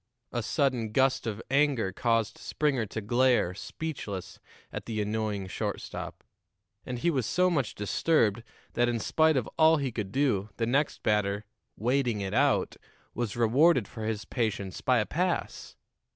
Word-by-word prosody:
A 120 Hz, -, -1 dB
sudden 125 Hz, -4 st, 0 dB
gust 130 Hz, -2 st, +2 dB
of 110 Hz, 0 st, -4 dB
anger 140 Hz, -8 st, +2 dB
caused 115 Hz, -3 st, 0 dB
Springer 135 Hz, -7 st, 0 dB
to 110 Hz, -, -5 dB
glare, 120 Hz, -3 st, +2 dB
speechless, 105 Hz, -, -6 dB, 0.3 s
at -, -, -5 dB
the 110 Hz, -2 st, -2 dB
annoying 105 Hz, -1 st, -1 dB
shortstop; 95 Hz, -, -5 dB, 0.6 s
and 125 Hz, -, -4 dB
he 170 Hz, +8 st, +1 dB
was 130 Hz, -7 st, -1 dB
so 180 Hz, 0 st, +2 dB
much 140 Hz, -9 st, -1 dB
disturbed 110 Hz, +1 st, +1 dB, 0.3 s
that, 120 Hz, 0 st, +2 dB
in 120 Hz, -, 0 dB
spite 155 Hz, +6 st, +3 dB
of 125 Hz, -, -1 dB
all 160 Hz, 0 st, +6 dB
he 140 Hz, -3 st, -2 dB
could 110 Hz, -4 st, -4 dB
do, 120 Hz, -7 st, +1 dB
the 115 Hz, -, 0 dB
next 140 Hz, +5 st, 0 dB
batter, 105 Hz, -1 st, +1 dB, 0.3 s
"waiting 125 Hz, -1 st, +1 dB
it 95 Hz, -1 st, -3 dB
out," -, -, +2 dB, 0.4 s
was 115 Hz, -4 st, -3 dB
rewarded 125 Hz, -, +4 dB
for 110 Hz, -2 st, -8 dB
his 105 Hz, -2 st, -2 dB
patience 105 Hz, -6 st, -2 dB
by 130 Hz, -1 st, +3 dB
a 105 Hz, -, +2 dB
pass. 180 Hz, -, -2 dB
120 Hz, 155 wpm, -29 LUFS, 105-140 Hz, 0.6 s, all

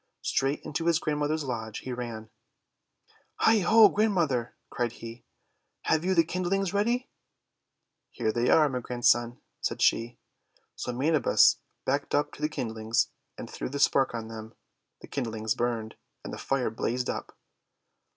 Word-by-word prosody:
Straight 135 Hz, +2 st, 0 dB
into 165 Hz, +3 st, -3 dB
his 170 Hz, -2 st, +4 dB
grandmother's 150 Hz, -1 st, -1 dB
lodge 110 Hz, -5 st, -4 dB
he 130 Hz, -, -4 dB
ran. 115 Hz, -3 st, -6 dB, 1.0 s
"Heigh! 225 Hz, -1 st, +4 dB
Ho! 215 Hz, +3 st, +7 dB
Grandmother!" 175 Hz, -, 0 dB, 0.2 s
cried 120 Hz, -1 st, -1 dB
he. 115 Hz, 0 st, -10 dB, 0.6 s
"Have 160 Hz, 0 st, +1 dB
you 185 Hz, +1 st, +1 dB
the 165 Hz, -, +6 dB
kindlings 185 Hz, +3 st, -1 dB
ready?' 235 Hz, +5 st, +1 dB, 1.0 s
"Here 110 Hz, -, -1 dB
they 120 Hz, +2 st, 0 dB
are, 155 Hz, -2 st, +6 dB
my 130 Hz, -3 st, -2 dB
Grandson," 120 Hz, 0 st, +1 dB, 0.2 s
said -, -, -2 dB
she. 115 Hz, +1 st, +2 dB, 0.6 s
So 125 Hz, -, -4 dB
Manabus 140 Hz, +2 st, +4 dB, 0.3 s
backed 140 Hz, +2 st, 0 dB
up 145 Hz, 0 st, +1 dB
to -, -, -12 dB
the 150 Hz, -, +1 dB
kindlings, 110 Hz, -4 st, -1 dB, 0.3 s
and -, -, -7 dB
threw -, -, -5 dB
the 140 Hz, -, -4 dB
spark 135 Hz, -3 st, +3 dB
on 115 Hz, -1 st, -5 dB
them. 110 Hz, 0 st, -9 dB, 0.5 s
The -, -, -11 dB
kindlings 110 Hz, -4 st, -2 dB
burned, 115 Hz, -2 st, -2 dB, 0.3 s
and -, -, -7 dB
the -, -, -6 dB
Fire 135 Hz, -4 st, -1 dB
blazed 120 Hz, +2 st, -2 dB
up. -, -, -5 dB
130 Hz, 150 wpm, -28 LUFS, 115-160 Hz, 1.0 s, Ho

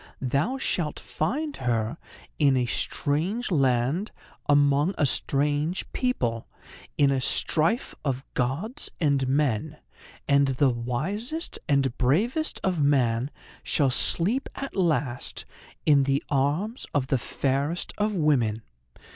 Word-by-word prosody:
Thou 140 Hz, -, 0 dB
shalt 170 Hz, -, -2 dB
find 285 Hz, -, -2 dB
her 120 Hz, +3 st, -1 dB, 0.4 s
in 140 Hz, -3 st, +4 dB
a 125 Hz, -, +2 dB
strange 170 Hz, -, -1 dB
land, 135 Hz, -, +1 dB, 0.4 s
among 145 Hz, +4 st, +4 dB
a 150 Hz, -, +3 dB
strange 145 Hz, +5 st, 0 dB
people, 120 Hz, -, -1 dB, 0.5 s
in 140 Hz, -1 st, +4 dB
a 135 Hz, -1 st, +1 dB
strife 165 Hz, -, +1 dB
of 135 Hz, -1 st, -2 dB
gods 165 Hz, -, -2 dB
and 140 Hz, -4 st, +2 dB
men; 145 Hz, +1 st, 0 dB, 0.5 s
and 140 Hz, -1 st, +4 dB
the 135 Hz, 0 st, +2 dB
wisest 180 Hz, -, -3 dB
and 135 Hz, -3 st, +2 dB
bravest 220 Hz, -, +1 dB
of 180 Hz, -5 st, +1 dB
man 130 Hz, -3 st, +2 dB, 0.3 s
shall 140 Hz, -3 st, +1 dB
sleep 205 Hz, -, +1 dB
at 275 Hz, -, -6 dB
last 150 Hz, -9 st, -1 dB, 0.4 s
in 140 Hz, -3 st, +5 dB
the 140 Hz, +1 st, +1 dB
arms 155 Hz, -, 0 dB
of 140 Hz, -3 st, +2 dB
the 135 Hz, -, +2 dB
fairest 140 Hz, +8 st, -1 dB
of 210 Hz, 0 st, +1 dB
women. 125 Hz, -, +1 dB
145 Hz, 120 wpm, -26 LUFS, 130-180 Hz, 0.5 s, in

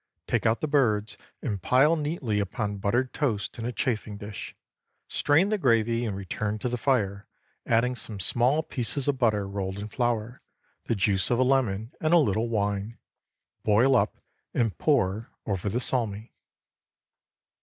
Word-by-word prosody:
Take -, -, +1 dB
out 110 Hz, +1 st, +1 dB
the 155 Hz, -, 0 dB
birds, 115 Hz, -7 st, +1 dB, 0.3 s
and 105 Hz, -7 st, -2 dB
pile 135 Hz, -, +4 dB
neatly 145 Hz, -9 st, -1 dB
upon 100 Hz, +1 st, -2 dB
buttered 120 Hz, +6 st, 0 dB
toast 115 Hz, -8 st, -2 dB
in 115 Hz, -, -3 dB
a -, -, -2 dB
chafing 110 Hz, -5 st, -2 dB
dish. 105 Hz, -1 st, -8 dB, 0.5 s
Strain 160 Hz, +7 st, +2 dB
the 215 Hz, -1 st, 0 dB
gravy 115 Hz, -, +2 dB
and 100 Hz, -, -3 dB
return 105 Hz, +2 st, -3 dB
to 125 Hz, -, -2 dB
the 125 Hz, -, -2 dB
fire, 100 Hz, -7 st, 0 dB, 0.4 s
adding 120 Hz, +2 st, +2 dB
some 110 Hz, -4 st, -7 dB
small 125 Hz, -, +2 dB
pieces 130 Hz, 0 st, -2 dB
of 140 Hz, -2 st, +1 dB
butter 105 Hz, -5 st, +2 dB
rolled 95 Hz, -1 st, -4 dB
in 105 Hz, +1 st, -6 dB
flour, 120 Hz, 0 st, -2 dB, 0.4 s
the 115 Hz, -, 0 dB
juice 95 Hz, -2 st, +2 dB
of 120 Hz, -, +2 dB
a 130 Hz, -, +4 dB
lemon 125 Hz, -4 st, +1 dB
and 155 Hz, +2 st, +3 dB
a -, -, +8 dB
little 115 Hz, -, +2 dB
wine. 105 Hz, 0 st, -1 dB, 0.6 s
Boil 115 Hz, +6 st, +4 dB
up, -, -, +1 dB, 0.4 s
and 115 Hz, -4 st, +1 dB
pour 115 Hz, -7 st, +1 dB, 0.2 s
over 100 Hz, -1 st, -2 dB
the 115 Hz, +5 st, -1 dB
salmi. 115 Hz, -4 st, 0 dB
115 Hz, 160 wpm, -27 LUFS, 105-130 Hz, 0.6 s, a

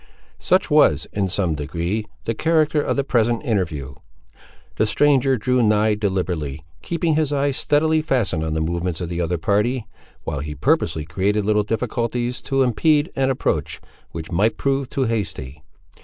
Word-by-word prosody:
Such -, -, +1 dB
was, 75 Hz, +1 st, +4 dB
in 100 Hz, -2 st, 0 dB
some 90 Hz, -2 st, 0 dB
degree, 85 Hz, +8 st, -3 dB, 0.2 s
the 115 Hz, -, 0 dB
character 155 Hz, +2 st, +2 dB
of -, -, -1 dB
the 140 Hz, -, +1 dB
present 120 Hz, 0 st, +1 dB
interview. 80 Hz, -, -2 dB, 0.8 s
The 110 Hz, -, +2 dB
stranger 135 Hz, +1 st, +3 dB
drew 125 Hz, +3 st, +1 dB
nigh 110 Hz, -1 st, +3 dB
deliberately; 90 Hz, -9 st, -2 dB, 0.2 s
keeping 170 Hz, -1 st, -1 dB
his 155 Hz, -1 st, +1 dB
eyes 140 Hz, -1 st, 0 dB
steadily 155 Hz, +2 st, +2 dB
fastened 115 Hz, -, 0 dB
on 80 Hz, -1 st, -2 dB
the 80 Hz, -, 0 dB
movements 85 Hz, +1 st, -2 dB
of 85 Hz, -, -4 dB
the 85 Hz, 0 st, -2 dB
other 85 Hz, +1 st, -1 dB
party, 105 Hz, +8 st, 0 dB, 0.4 s
while 75 Hz, -, -3 dB
he 75 Hz, +1 st, -5 dB
purposely 85 Hz, -, 0 dB
created 100 Hz, +6 st, 0 dB
little 105 Hz, 0 st, +3 dB
difficulties 120 Hz, +2 st, -2 dB
to 135 Hz, -1 st, +3 dB
impede 145 Hz, +5 st, +2 dB
an 135 Hz, 0 st, +1 dB
approach 135 Hz, -, -1 dB, 0.3 s
which 80 Hz, +1 st, -7 dB
might 105 Hz, +6 st, +1 dB
prove 135 Hz, -1 st, -1 dB
too 135 Hz, -, -1 dB
hasty. 95 Hz, -, -3 dB
110 Hz, 160 wpm, -21 LUFS, 85-135 Hz, 0.8 s, was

